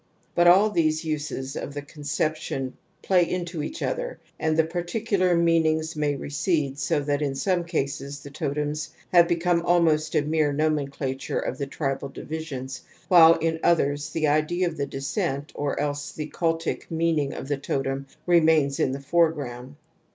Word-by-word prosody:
Jtsut 175 0 +5
all 195 +5 +6
these 160 -3 +1
uses 145 -3 -3
ofthe 145 0 -6
conception 145 -3 -3 0.3
pTaylnto 175 -3 +1
each 310 - -5
other - - -3 0.2
and 160 0 +1
the 160 - +5
particular 180 +2 0
meanings 160 -1 +2
may 150 -1 0
recede 145 0 -1
so 155 -2 +1
that 145 0 -1
in 140 -2 -1
some 180 +4 0
cases 140 -3 -3
the 140 - -10
totems 150 0 -2 0.2
have 175 -1 +6
become 170 0 +1
almost 160 -3 +2
a 145 - +3
mere 155 -1 +1
nomenclature 140 -3 -1
of 130 - -3
the 140 - -2
tribal 140 -1 -3
divisions, 135 -3 -6 0.3
while 165 -2 +8
in 160 0 -1
others 145 -3 +2
the 155 0 -1
idea 155 +5 +2
of 170 - -4
the 140 -2 -2
descent 140 +1 -3
or 145 -1 -2
else 145 0 -2
the 155 -1 -6
cultic 165 -1 -1
meaning 160 -4 +1
of - - -6
the 145 -1 -1
totem 135 0 -2 0.2
remains 160 -5 +4
in 130 - +1
the 140 - -5
fore 165 +3 +3
sroimd. 130 -3 -7
155 Hz, 160 wpm, -25 LUFS, 140-170 Hz, 0.3 s, while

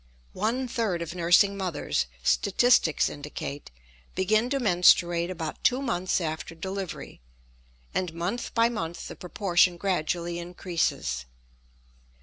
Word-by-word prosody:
One 235 +6 -1
third 210 -8 -1
of 170 0 -7
nursing 180 +3 +4
mothers, 180 - -1 0.2
statistics 200 - +3
indicate, 145 0 -6 0.5
begin 215 +5 +2
to 275 0 0
menstruate 175 -4 +4
about 165 -4 -5
two 255 0 +3
months 185 -10 0
after 160 0 -4
delivery, 190 - -6 0.7
and 180 -2 -1
month 175 +8 -3
by 230 0 +5
month 170 -8 -4
the - - -8
proportion 180 -1 +2
gradually 175 -2 -1
increases. 170 - -2
180 Hz, 115 wpm, -27 LUFS, 170-205 Hz, 0.7 s, by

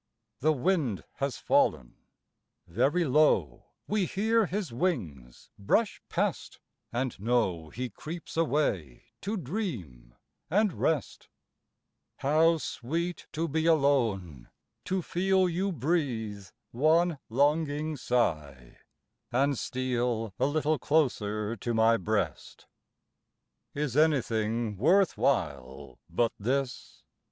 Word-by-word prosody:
The 155 +4 +3
wind 150 - 0
has 140 -1 -2
fallen; - - +1 0.7
very 135 - +1
low 125 - +2 0.2
We 205 -3 +1
hear 220 +1 +2
his 190 - -3
wings 85 - -3
brush 200 - +1
past, - - -2 0.3
and 125 -1 -2
know 95 -8 0
He 125 +6 -5
creeps 165 - -8
away 145 - 0 0.2
to 210 +3 -2
dream 115 - -5 0.3
and 205 +2 +2
rest; 155 -6 -1 0.9
How 160 +4 +3
sweet 165 +7 -4
to 165 +2 -1
be 160 +2 0
alone, 115 - +1 0.4
to 185 -1 -1
feel 190 +2 +2
You 185 +3 -1
breathe 125 - -2 0.2
one 160 +4 +2
longing 150 +4 +1
sigh, 75 - -2 0.5
and 140 +3 +2
steal 120 -4 -2
A - - +3
little 155 0 0
closer 110 -8 0
to 120 +3 -2
my 115 +1 +4
breast. 95 - -3 1.1
Is 145 -3 -2
anything 115 -8 +1
worth 180 - +4
while 65 0 -2
but 115 -1 +1
this? 130 +4 -3
135 Hz, 105 wpm, -29 LUFS, 105-160 Hz, 1.1 s, my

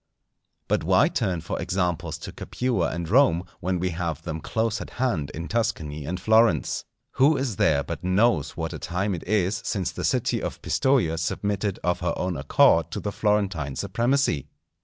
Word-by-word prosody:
But - - +1
why - - +4
turn 90 -3 -1
for 85 - -4
examples 90 -3 -1
to - - -6
Capua 120 -9 -1
and 85 0 -4
Rome, 110 - +4 0.2
when 90 +1 -1
we 90 +1 -1
have 85 -1 -3
them 80 -1 -4
close 110 +3 -1
at - - -7
hand 105 - 0
in 85 +2 -5
Tuscany 80 -11 -2
and 90 +5 -3
Florence? 110 -4 +3 0.3
Who 140 +3 +5
is 130 -7 -2
there 70 -2 +3
but - - -6
knows 95 - +2
what - - -3
a - - -6
time 95 +3 -1
it 85 - -5
is 100 -1 +1
since 95 -5 -1
the - - -6
city - - +1
of - - -4
Pistoja 120 -13 +2
submitted 100 +3 -1
of 90 0 +1
her 85 -2 -1
own 90 -1 -1
accord 75 +3 +4
to - - -2
the 105 - -3
Florentine 100 -11 0
supremacy? 120 - 0
90 Hz, 180 wpm, -25 LUFS, 80-110 Hz, 0.3 s, Who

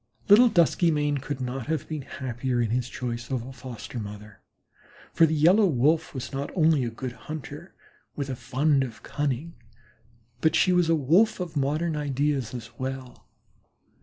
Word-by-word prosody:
Little 235 +5 +8
Duskymane 155 -5 +2
could 145 -1 -5
not 125 -1 -4
have 155 -2 -2
been 155 -2 -4
happier 130 -1 -3
in 115 -2 0
his 125 +1 -1
choice 120 -2 -5
of 125 -3 -2
a 130 - -9
foster 125 -2 -8
mother, 105 -1 -9 0.7
for 165 - +5
the 160 - 0
Yellow 180 +8 +5
Wolf 155 +2 +1
was 130 0 -5
not 140 +1 -3
only 160 -5 +3
a 120 - -1
good 125 +2 -6
hunter 140 +5 -9 0.4
with 140 - -3
a 130 - -3
fund 135 +4 +1
of 115 -3 -8
cunning, 145 +3 -2 0.9
but 160 +4 +2
she 185 - +4
was 175 -2 +3
a 165 - +5
Wolf 175 - +3
of 175 -3 -5
modern 150 +4 0
ideas 145 -3 -1
as 115 -1 -8
well. 130 -1 -6
140 Hz, 165 wpm, -26 LUFS, 125-160 Hz, 0.9 s, Little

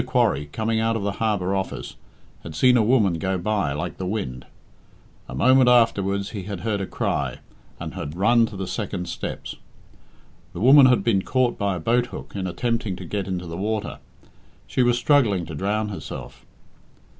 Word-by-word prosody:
Quarry, 75 +2 +1
coming 110 +3 -1
out 115 0 +1
of 110 - -2
the 100 - 0
harbour 100 -4 0
office, 95 -1 -4 0.5
had 80 -2 -9
seen 125 +8 +5
a 120 - +5
woman 105 -7 +2
go 95 +2 -1
by 100 -4 0
like 75 +5 -4
the 95 - -3
wind. 65 - -4 0.8
A - - -6
moment 130 -1 +5
afterwards 100 -5 +2
he 105 - -5
had 100 -3 -5
heard 105 -1 -1
a 95 - -3
cry, - - -2 0.4
and - - -6
had 75 +3 -6
run 115 +4 +4
to 105 - -9
the 95 - -3
second 95 -3 -4
steps. 85 - -6 1.0
The - - -6
woman 130 +5 +8
had 125 -1 +3
been 105 -5 +2
caught 130 +3 +1
by 100 -2 -1
a - - -4
boathook 120 +8 -1
in 95 -2 -2
attempting 110 +2 -2
to 90 0 -8
get 100 +1 -3
into 90 -1 -3
the 85 0 -6
water. 105 +2 -3 0.7
She - - -1
was 120 -1 +3
struggling 120 - +3
to 80 - -8
drown 105 +6 -1
herself. 100 - -8
100 Hz, 180 wpm, -23 LUFS, 90-115 Hz, 1.0 s, woman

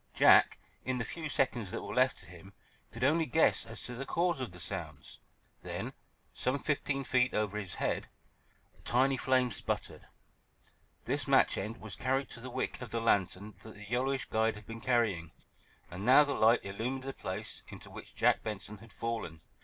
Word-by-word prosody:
Jack, - - +7 0.3
in 130 0 -1
the 115 - -2
few 160 +3 -5
seconds 120 -7 0
that - - -4
were 100 - -5
left 130 +1 +3
to - - -10
him, 90 +3 -13 0.4
could 115 +2 -5
only 155 +4 +3
guess 160 - +3
as 115 - -8
to 125 - -5
the 125 +3 -4
cause 170 +2 0
of 125 -6 -4
the 90 - -10
sounds. 85 -5 -5 0.4
Then, - - -5 0.4
some 130 +2 0
fifteen 140 -1 -1
feet 125 -1 +2
over 105 -1 0
his 95 -4 -6
head, - - -1 0.7
a - - -24
tiny 130 +3 +2
flame 130 -1 +2
sputtered. - - -4 1.0
This - - -1
match - - +5
end 110 +4 -4
was 110 -4 -8
carried 135 +2 0
to 115 - -8
the 130 +2 -7
wick 120 - -3
of 125 - -6
the 115 - -1
lantern 100 -2 +1
that 110 - -11
the 105 - -10
yellowish 130 +2 0
guide 110 0 +1
had 105 0 -11
been 115 0 -8
carrying, 110 - +1 0.6
and 90 +3 -6
now 130 +6 +8
the 145 -1 -1
light 115 -1 +4
illumined 120 +7 -3
the 135 0 -4
place - - -5
into - - -11
which - - -11
Jack - - +3
Benson 105 -1 -6
had 115 +1 -15
fallen. 110 -10 -4
115 Hz, 190 wpm, -32 LUFS, 105-130 Hz, 1.0 s, now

